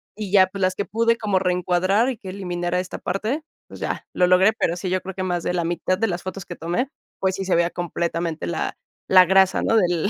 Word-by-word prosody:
Y 210 -2 -6
ya, 190 -2 +6
pues 195 +1 -8
las 185 0 +2
que 200 - -2
pude 230 +1 +1
como 205 -4 +1
reencuadrar 180 +4 +1
y 255 - -4
que 190 - -9
eliminara 180 -2 -2
esta 185 0 -5
parte, 220 - -2 0.2
pues, - - -12
ya - - -3
lo 180 - +3
logré, 185 +4 +5
pero 175 -5 -1
sí, 185 +1 -3
yo 185 0 0
creo 190 - -7
que 185 - -3
más 175 -2 -1
de - - -1
la 175 -2 0
mitad 175 +2 -1
de 225 - +1
las 175 -3 -3
fotos 185 0 -6
que 175 - -7
tomé, 175 +13 -2 0.3
pues, 190 -1 0
sí 195 - -3
se 185 - +2
veía 170 0 +3
completamente 170 -1 -3
la 170 - -3 0.3
la 185 -1 +8
grasa, 190 +1 +4
¿no? - - +2
Del 175 -2 +2
185 Hz, 245 wpm, -23 LUFS, 175-195 Hz, 0.3 s, la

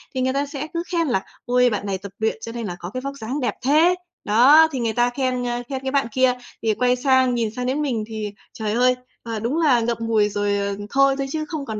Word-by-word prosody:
thì 255 - 0
người 260 +1 +1
ta 280 +1 0
sẽ 285 +1 -5
cứ 335 0 -2
khen 335 -3 +1
là 195 -7 0 0.2
"Ôi, 250 0 +3
bạn 210 -2 -3
này 195 -1 -2
tập 195 +1 -9
luyện 220 0 0
cho 230 - -6
nên 235 -2 -5
là 175 - -4
có 175 - -6
cái 255 - -3
vóc 275 +1 -4
dáng 255 +6 -4
đẹp 240 -5 -1
thế." 320 +6 +5 0.3
Đó, 275 +10 +6
thì 265 - -3
người 225 -2 -1
ta 240 +1 +2
khen, 255 -1 -1
ơ, 240 0 -2
khen 265 -1 -3
cái 265 - -3
bạn 275 -4 +1
kia. 255 -1 +3 0.3
Thì 220 -1 +2
quay 250 +2 +2
sang 260 -1 +3
nhìn 230 -2 0
sang 250 0 -3
đến 270 +4 0
mình 240 -7 -1
thì, 215 -2 -5 0.2
trời 215 -1 -3
ơi, 250 +1 +3 0.3
ờ, 225 -2 -4
đúng 240 +8 -1
là 290 -8 +4
ngậm 230 0 -1
ngùi 220 -2 +2
rồi, 205 0 0
ờ, 200 0 -2
thôi, 275 0 +4
thôi, 275 0 -2
chứ 310 -1 -2
không 300 -3 -5
còn 220 -3 -4
250 Hz, 270 wpm, -22 LUFS, 220-275 Hz, 0.3 s, Đó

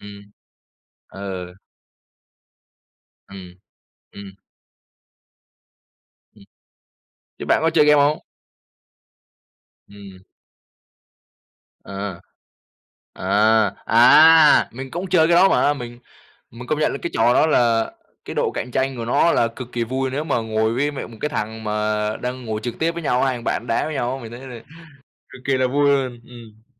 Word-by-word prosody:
Ừm. 100 0 -13 0.8
Ừ. 95 -2 -7 1.8
Ừm, 90 -2 -11 0.6
ừm. 100 -1 -11 2.0
Ừm. - - -19 1.0
Thế - - -6
bạn - - +2
có 165 - +3
chơi 160 -2 +3
game 150 -1 +5
hông? 150 +2 0 1.6
Ừm. 100 -2 -14 1.6
À, 100 -2 -6 0.9
à, 105 +2 +2
à! 150 +7 +6
Mình 130 +2 -9
cũng 180 +3 -5
chơi 165 -3 +4
cái 170 - +3
đó 190 +3 +5
mà. 145 - +2
Mình 120 -3 -9 0.5
mình 125 +2 -11
công 155 - -1
nhận 155 - 0
là - - -5
cái - - -3
trò 115 +2 +3
đó - - +4
là 115 -6 +2 0.3
cái - - -7
độ - - 0
cạnh 125 - -5
tranh 130 +1 -1
của 115 - -5
nó 145 +8 +2
là 115 - +2
cực 120 +1 -10
kỳ 120 -1 -2
vui 130 +2 -3
nếu 145 +4 -3
mà 145 -5 -1
ngồi 110 0 -1
với, 145 +4 0
mẹ 145 - -7
một 115 - -13
cái 150 - -1
thằng 110 -5 -5
mà 105 0 -1
đang 125 0 -6
ngồi 110 -2 -4
trực 120 +1 -6
tiếp 165 +1 0
với 170 0 -7
nhau, 125 -4 0
hai 130 -2 0
thằng 120 - -10
bạn 120 - -2
đá 115 - 0
với 155 - -5
nhau 125 -2 -2
á, 135 - -10
mình 115 0 -10
thấy 120 - -9
là 120 -3 -9 0.7
cực 130 - -14
kỳ 140 - 0
là 130 0 +1
vui 145 +2 +1
luôn, 130 -4 -1
ừm. 115 -3 -15
120 Hz, 160 wpm, -21 LUFS, 110-140 Hz, 2.0 s, à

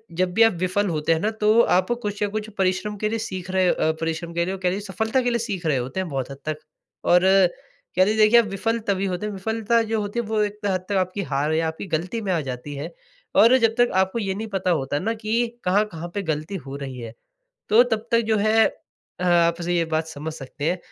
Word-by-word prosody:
जब 180 +1 0
भी 225 +4 +5
आप 225 -3 +5
विफल 190 +3 +1
होते 155 0 +1
हैं 160 - 0
ना 210 - 0
तो 215 +2 +5
आप 185 -4 +2
कुछ 205 -1 -4
या 205 - +2
कुछ 215 +1 -4
परिश्रम 190 +2 0
के 215 +1 -1
लिए 225 +1 -2
सीख 185 -3 -5
रहे 185 -1 +2
अ, 160 - +2
परिश्रम 165 +1 -3
के 170 0 0
लिए 190 - -2
और 195 - -6
कह 185 -1 +1
लीजिए 195 +3 -2
सफलता 220 +5 +1
के 245 - 0
लिए 235 -1 0
सीख 200 -7 -4
रहे 150 -4 +2
होते 130 +9 -3
हैं 185 - -2
बहुत 135 -3 -3
हद 135 - -8
तक। 155 -1 -1 0.5
और 175 0 +5
कहते 190 0 +1
हैं 220 - 0
देखिए 215 +2 +6
आप 235 - +2
विफल 220 +4 -1
तभी 195 -1 +1
होते 185 +1 -2
हैं 210 - -3
विफलता 220 +3 0
जो 225 -1 +1
होती 205 +3 -3
है 235 - -2
वो 215 0 0
एक 210 0 -3
हद 185 -2 -1
तक 200 - 0
आपकी 185 +2 -1
हार 145 +3 +1
या 160 0 +1
आपकी 160 +5 -5
गलती 180 +7 -2
में 195 -3 -2
आ 170 - +1
जाती 130 +1 -6
है। 150 +5 -5 0.4
और 235 +4 +7
जब 225 -3 +2
तक 245 - +4
आपको 190 +4 +1
ये 195 -3 -1
नहीं 220 +2 -4
पता 190 -3 -1
होता 145 -2 0
ना 225 +6 -1
कि 225 +2 0 0.2
कहाँ-कहाँ 180 -3 0
पे 200 - 0
गलती 155 +3 -3
हो 135 0 -7
रही 135 -2 -6
है, 115 -1 -7 0.6
तो 220 +4 +7
तब 225 -3 -2
तक 230 0 +4
जो 220 - +2
है 215 +2 +4 0.5
अ, - - -3
आपसे 175 0 +2
ये 170 -1 +2
बात 160 0 0
समझ 155 0 -6
सकते 145 0 -7
हैं 180 - -1
190 Hz, 250 wpm, -23 LUFS, 165-215 Hz, 0.6 s, और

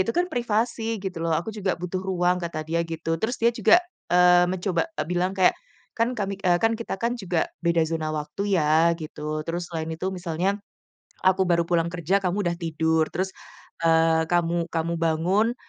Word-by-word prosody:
itu 230 - 0
kan 355 +1 +3
privasi 230 -1 -1
gitu 185 -4 -4
loh, 165 - +1
aku 175 - -3
juga 195 -4 -1
butuh 180 +1 -3
ruang, 180 -1 +1
kata 160 -2 -3
dia 170 +1 0
gitu. 165 0 -2
Terus 240 +3 -1
dia 235 - +4
juga, 295 - +5 0.3
eee, 180 0 +6
mencoba, 185 - 0
e - - -2
bilang 180 +1 0
kayak, 185 - +5 0.4
"Kan 235 +2 +1
kami" 200 -1 -2
eee, 175 -1 +5
"Kan 225 0 +3
kita 230 -4 -4
kan 235 +1 0
juga 180 -7 -1 0.2
beda 170 -1 +3
zona 160 -1 -2
waktu 155 +7 -2
ya," 160 +2 +4
gitu 155 0 -5
terus 175 +1 -3
selain 160 -1 -4
itu 175 +4 -3
misalnya, 180 +2 -1 0.7
"Aku 185 0 +3
baru 170 -1 +3
pulang 170 -1 +2
kerja 180 +3 +1
kamu 190 +2 0
udah 170 -1 0
tidur. 160 -1 +1
Terus, 190 +1 -2 0.5
eee, 160 0 +4
kamu 170 -1 +1
kamu 165 0 -1
bangun, 180 +8 +2
175 Hz, 185 wpm, -25 LUFS, 165-195 Hz, 0.7 s, eee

